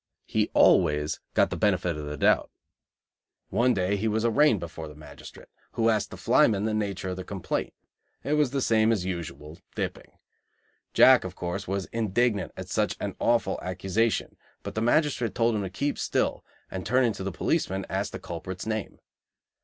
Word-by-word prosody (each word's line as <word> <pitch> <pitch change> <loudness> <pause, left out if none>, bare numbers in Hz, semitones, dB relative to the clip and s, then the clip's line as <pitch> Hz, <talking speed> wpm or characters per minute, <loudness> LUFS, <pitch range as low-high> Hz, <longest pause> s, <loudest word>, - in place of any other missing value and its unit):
He - - 0
always 75 -3 +4 0.2
got - - +3
the - - -1
benefit 85 -2 +1
of 75 -1 -6
the 75 0 -5
doubt. - - +3 1.0
One 125 +1 +2
day 95 +1 +1
he 110 +3 -1
was 110 +1 0
arraigned 120 -1 +4
before 85 -2 -7
the 75 - -11
magistrate, 75 +1 -13 0.2
who 115 0 +2
asked 105 -2 0
the - - -9
flyman 105 -2 +3
the 110 - 0
nature 100 -3 -2
of 90 - -4
the 95 - -5
complaint. 95 -2 -3 0.5
It 145 - -1
was 150 -3 +3
the 135 0 -1
same 110 0 +3
as 100 -5 0
usual 80 -4 -6 0.2
dipping. - - -4 0.8
Jack, - - +7
of - - -7
course, 85 0 -4
was 95 0 -2
indignant 110 -1 0
at - - -6
such - - 0
an - - -4
awful 120 -1 +1
accusation, 95 +5 -1 0.3
but - - -6
the 110 - -2
magistrate 125 -2 +1
told 115 0 +2
him 105 - -1
to 95 - -3
keep 140 +10 -2
still, - - 0 0.3
and, 95 -1 -4
turning 125 0 +2
to 95 - -6
the 95 - -2
policeman, 95 - -1
asked 95 +2 -2
the - - -5
culprit's 90 +2 -7
name. 110 -1 -3
100 Hz, 180 wpm, -27 LUFS, 90-115 Hz, 1.0 s, Jack